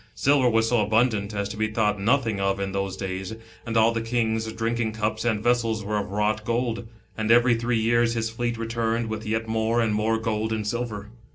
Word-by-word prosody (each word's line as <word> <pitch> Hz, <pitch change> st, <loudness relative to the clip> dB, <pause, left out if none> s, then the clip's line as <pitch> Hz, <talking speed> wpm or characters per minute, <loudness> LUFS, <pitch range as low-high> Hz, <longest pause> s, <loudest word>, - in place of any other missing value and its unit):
Silver 135 Hz, -2 st, +3 dB
was 115 Hz, -1 st, +2 dB
so 120 Hz, -3 st, +3 dB
abundant, 110 Hz, -1 st, +1 dB
as 100 Hz, -1 st, -2 dB
to 105 Hz, -, -7 dB
be 110 Hz, 0 st, +1 dB
thought 105 Hz, -2 st, 0 dB
nothing 115 Hz, -2 st, +1 dB
of 95 Hz, 0 st, 0 dB
in 100 Hz, 0 st, -2 dB
those 100 Hz, -1 st, -3 dB
days, 95 Hz, +2 st, -4 dB, 0.3 s
and 115 Hz, 0 st, 0 dB
all 110 Hz, +1 st, +5 dB
the 115 Hz, 0 st, -2 dB
king's 110 Hz, -1 st, -1 dB
drinking 115 Hz, 0 st, -1 dB
cups 110 Hz, 0 st, -2 dB
and 110 Hz, -3 st, 0 dB
vessels 115 Hz, -3 st, +1 dB
were 105 Hz, +1 st, -1 dB
of 100 Hz, -, -4 dB
wrought 105 Hz, +2 st, 0 dB
gold, 115 Hz, 0 st, -1 dB, 0.3 s
and 110 Hz, 0 st, -2 dB
every 120 Hz, +1 st, +6 dB
three 115 Hz, 0 st, 0 dB
years 115 Hz, +1 st, +2 dB
his 115 Hz, -1 st, 0 dB
fleet 120 Hz, 0 st, -2 dB
returned 115 Hz, 0 st, -1 dB
w: 110 Hz, -1 st, -4 dB
th 110 Hz, -1 st, -5 dB
yet 110 Hz, 0 st, -1 dB
more 110 Hz, +1 st, +1 dB
and 110 Hz, -2 st, +1 dB
more 110 Hz, +1 st, +1 dB
gold 110 Hz, -1 st, -2 dB
and 110 Hz, -1 st, -2 dB
silver. 105 Hz, -2 st, -4 dB
110 Hz, 215 wpm, -25 LUFS, 105-115 Hz, 0.3 s, every